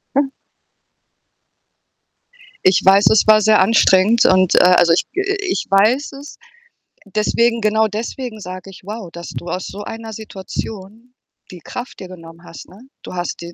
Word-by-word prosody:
Hm. 280 0 +2 2.4
Ich 185 -1 +4
weiß, 195 +2 +5
es 220 - +4
war 215 0 +6
sehr 215 +1 +4
anstrengend, 210 +1 +4
und 185 -1 +4
a 180 0 +5
also, 175 -1 +4
ich 165 - 0
ge 385 - -2 0.2
ich 370 - -2
weiß 220 +9 +2
es. 280 +2 -11 0.7
Deswegen 230 +3 0
genau 220 +1 +2
deswegen 225 +2 -6
sage 185 -1 -9
ich: 190 - -14
„Wow, 205 -1 -7
dass 170 0 -9
du - - -8
aus 180 +2 -4
so 205 - -8
einer 225 +1 -8
Situation 215 +2 -8 0.4
die 180 - -11
Kraft 245 +9 -8
dir 185 - -8
genommen 165 -2 -13
hast“, 165 - -12
ne? 190 - -17 0.2
Du - - -9
hast 175 -1 -5
die 170 0 -9
205 Hz, 160 wpm, -18 LUFS, 185-225 Hz, 2.4 s, war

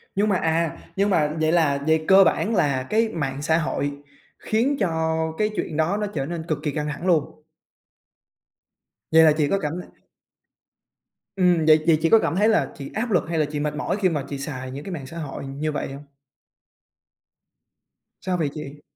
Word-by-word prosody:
Nhưng 210 +2 +2
mà, 190 - +2
à, 165 -1 0 0.2
nhưng 200 +1 +1
mà 155 -5 +2
vậy 155 0 +2
là 150 -5 +2
vậy 160 0 +2
cơ 195 0 +8
bản 220 +3 +1
là 140 -7 +1
cái 220 - +1
mạng 140 -5 -3
xã 160 +2 +2
hội 145 -3 -1 0.5
khiến 255 +6 0
cho 160 -3 0 0.2
cái 215 0 +1
chuyện 155 - -3
đó 170 +6 +1
nó 210 - -1
trở 135 -3 -2
nên 165 +1 -5
cực 155 -3 0
kì 150 - -1
căng 150 0 -3
thẳng 175 +6 -6
luôn? 160 -5 +4 1.9
Vậy 160 0 +7
là 155 - +7
chị 150 - +2
có 195 +6 +1
cảm 150 0 -3
la 180 - -8 1.5
Ừm, 180 -4 +3
vậy 155 -1 +5
chị 165 -2 +5
chị 165 - +2
có 225 - +7
cảm 170 - -1
thấy 210 +3 +3
là 220 - +1
chị 140 -1 -8
áp 225 +1 -2
lực 175 -6 +3
hay 165 - -1
là 150 - +3
chị 150 - -3
mệt 150 0 -2
mỏi 190 - -2
khi 185 - +4
mà 150 -4 -2
chị 140 - -4
xài 130 -2 -6
những 140 +2 -7
cái 195 - -7
mạng 140 -5 -6
xã 165 - -9
hội 150 -3 -6
như 145 +3 -3
vậy 135 - -4
hông? 140 - -9 2.2
Sao 185 -1 -1
vậy 155 -4 0
chị? 145 -1 -8
160 Hz, 205 wpm, -23 LUFS, 145-185 Hz, 2.2 s, cơ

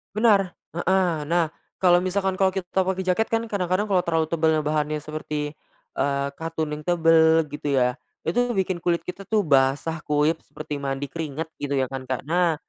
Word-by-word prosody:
Benar 205 -4 +3 0.2
heeh. 175 -3 +1
Nah, 165 -1 +1 0.2
kalo 175 -1 +5
misalkan 190 +1 -1
kalau 190 - +5
kita 190 0 -1
pake 190 0 -1
jaket 185 +5 +1
kan 225 0 0
kadang-kadang 185 -1 0
kalo 195 -3 +2
terlalu 165 -2 0
tebel 160 -2 +2
bahannya 150 0 -1
seperti, 150 -1 -4 0.5
eee, 140 0 +1
katun 160 -2 -3
yang 150 0 -5
tebel 165 -1 +5
gitu 145 -1 -2
ya, 125 -1 +1 0.2
itu 245 +7 0
bikin 185 -2 0
kulit 170 0 0
kita 195 +2 -8
tuh 215 -2 +2
basah 145 +2 +2
kuyup 150 +2 +2
seperti 150 -1 -7
mandi 135 0 -3
keringat, 160 0 -4
gitu 140 0 -2
ya 130 -1 0
kan, 130 -1 -6
Kak. 130 -1 -2
Nah, 170 +2 +2
165 Hz, 175 wpm, -24 LUFS, 150-185 Hz, 0.5 s, kalo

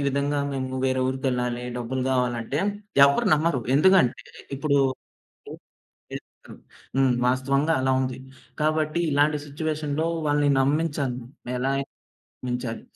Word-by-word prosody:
విధంగా 140 +1 0
మేము 130 -1 -3
వేరే 130 0 +1
ఊరికెళ్ళాలి. 125 -2 -2
డబ్బులు 125 +2 -3
గావాలి 125 -2 +1
అంటే 140 +6 -3 0.5
ఎవరు 140 - +1
నమ్మరు. 155 -4 0
ఎందుకంటే 180 -4 +4 0.3
ఇప్పుడు 140 0 +1 1.4
చేస్తారు, - - -11 0.4
హ్మ్. 135 -2 +4
వాస్తవంగా 140 +5 +1
అలా 130 - +1
ఉంది. 130 -1 -3 0.4
కాబట్టి 155 +1 +1
ఇలాంటి 145 +1 +2
సిట్యుయేషన్‌లో 155 +1 -2 0.2
వాళ్ళని 145 0 +2
నమ్మించాలి. 140 -3 0 0.4
ఎలా 135 +2 0
అయినా 140 0 -4 0.6
నమ్మించాలి. 125 -2 -3
140 Hz, 110 wpm, -25 LUFS, 130-150 Hz, 1.4 s, ఎందుకంటే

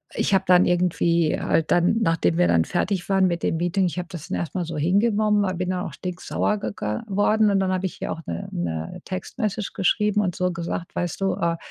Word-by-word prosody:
ich - - 0
habe 190 0 +3
dann 180 0 +6
irgendwie 170 -2 +2
halt 160 - 0
dann, 175 +5 +3
nachdem 165 - +1
wir 90 - +4
dann 85 -1 +3
fertig 185 +1 -1
waren 195 -1 +4
mit 170 -1 -2
dem 165 - +1
Meeting 175 +3 +1
ich 175 - -5
habe 180 - -5
das 165 -5 -8
dann - - -1
erstmal 175 +2 -3
so 165 -1 -5
hingenommen, 205 +5 +2
aber 185 -1 -1
bin 180 +1 -2
dann 180 -1 -2
auch - - -7
stinksauer 180 +3 -2
ge - - -3
geworden 205 - +1
und 195 - +2
dann 190 -1 +1
habe 185 +1 -1
ich 185 - -3
hier - - -4
auch 165 - -9
'ne 85 0 -5
'ne 80 -2 -4
Text-Message 210 +2 -3
geschrieben 210 +2 +2
und 180 -4 -1
so 180 0 0
gesagt: 170 0 -5
„Weißt 175 -2 -2
du, 195 0 +1
äh, 170 0 0
180 Hz, 225 wpm, -24 LUFS, 170-195 Hz, -, dann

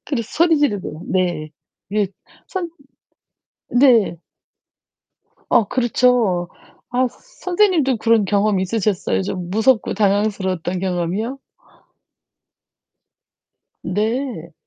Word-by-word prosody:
그래서 240 -5 -3
소리 330 0 +3
지르고요. 205 - -1
네. 175 -5 0 0.4
이게 205 -1 0 0.4
선 370 -3 -3 1.0
네. 245 -9 +4 1.3
어 225 - +4
그렇죠. 240 -7 +2 0.4
아 255 +1 +2
서 245 - -23
선생님도 365 - +1
그런 225 -1 +3
경험이 200 -1 +1
있으셨어요? 200 -1 0
좀 185 -2 -4
무섭고 220 +3 +2
당황스러웠던 195 -3 0
경험이요? 190 +7 -2 2.5
네. 215 - -2
215 Hz, 200 characters per minute, -20 LUFS, 185-255 Hz, 2.5 s, 네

